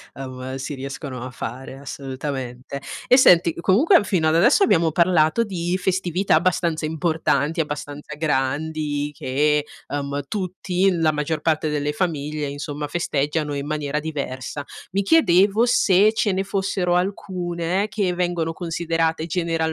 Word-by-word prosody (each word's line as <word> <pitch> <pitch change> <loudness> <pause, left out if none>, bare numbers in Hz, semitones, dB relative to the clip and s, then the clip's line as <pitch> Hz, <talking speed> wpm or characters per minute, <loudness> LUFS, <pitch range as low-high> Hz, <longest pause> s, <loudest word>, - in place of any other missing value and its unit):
ehm, 130 -1 -6
si 135 +2 -5
riescono 135 -1 -6
a 130 - -5
fare, 130 +2 -7
assolutamente. 135 -1 -6 0.3
E 250 - +7
senti, 170 -9 +6
comunque 230 - +4
fino 170 -6 +1
ad 155 - +3
adesso 240 - +5
abbiamo 170 - +3
parlato 170 +5 +3
di 180 -3 -2
festività 185 0 0
abbastanza 170 -1 +1
importanti, 160 -1 0
abbastanza 145 0 -6
grandi 150 0 -1
che, 150 +3 +1 0.2
ehm, 140 0 -3
tutti 185 0 0
la 165 -3 +2
maggior 150 +1 -2
parte 155 -1 +1
delle 150 0 -1
famiglie, 150 -3 -2
insomma 145 +1 -5
festeggiano 150 -2 -1
in 140 0 -4
maniera 150 -1 -2
diversa. 140 -2 -5 0.3
Mi 200 - +1
chiedevo 205 - +4
se 210 -3 +4
ce 215 -2 +1
ne 190 +1 0
fossero 190 -2 0
alcune 180 0 -1
che 195 -4 -1
vengono 175 -2 -1
considerate 165 -1 -1
generalmente 170 -1 -1
160 Hz, 135 wpm, -22 LUFS, 145-180 Hz, 0.3 s, E